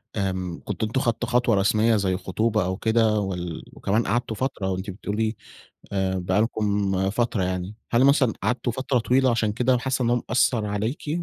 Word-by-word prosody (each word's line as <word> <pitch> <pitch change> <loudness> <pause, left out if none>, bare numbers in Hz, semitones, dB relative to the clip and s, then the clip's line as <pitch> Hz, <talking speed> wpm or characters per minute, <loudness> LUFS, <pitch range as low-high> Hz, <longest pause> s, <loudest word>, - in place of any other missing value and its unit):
آمم 95 -4 -2
كنتم 105 +2 -2
أنتم 115 +4 -1
اخدتم 120 0 -1
خطوة 125 -1 +2
رسميّة 110 +3 +3
زي 95 -3 +1
خطوبة 110 +2 0
أو 95 +1 -2
كده 110 -1 +2
وال 90 -4 -4
وكمان 110 +4 0
قعدتوا 115 +1 -1
فترة. 120 -6 -2
وأنتِ 95 +2 -4
بتقولي 105 +3 -2 0.6
آآ 95 -1 0
بقى 95 +3 +1
لكم 100 -4 0
فترة 115 -2 0
يعني. 90 +2 -3 0.2
هل 120 +2 +4
مثلًا 135 -5 +4
قعدتوا 120 +3 0
فترة 130 +2 0
طويلة، 125 +4 +3
عشان 115 -2 +1
كده 125 +3 +2
حاسّة 130 +1 -1
إن 120 - +1
هو 120 0 +2
مأثّر 120 -3 +2
عليكِ؟ 110 +9 -3
110 Hz, 175 wpm, -24 LUFS, 95-120 Hz, 0.6 s, هل